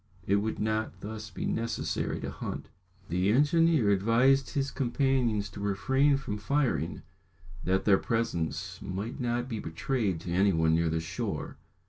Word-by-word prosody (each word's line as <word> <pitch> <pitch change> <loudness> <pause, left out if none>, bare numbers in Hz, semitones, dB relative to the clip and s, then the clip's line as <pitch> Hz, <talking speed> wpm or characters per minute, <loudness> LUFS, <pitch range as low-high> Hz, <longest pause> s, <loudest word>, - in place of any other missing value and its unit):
It 100 - +3
would 110 +2 -1
not 110 0 -2
thus 110 0 -6
be - - -5
necessary 115 +1 -2
to - - -4
hunt. - - -6 0.4
The 90 +3 +1
engineer 150 -2 +4
advised 120 +7 +3
his 140 -1 0
companions 125 -5 +1
to 100 - -9
refrain 135 +8 +2
from 105 -6 -4
firing, 105 - 0 0.6
that 95 +1 +1
their 100 -2 +5
presence 95 -4 -2
might 100 +7 -4
not 120 0 -1
be 115 -4 -4
betrayed 95 +2 -1
to 85 - -5
any 95 +2 +3
one 80 0 +3
near 85 0 +2
the 80 0 -1
shore. 85 +1 -4
110 Hz, 150 wpm, -29 LUFS, 95-130 Hz, 0.6 s, their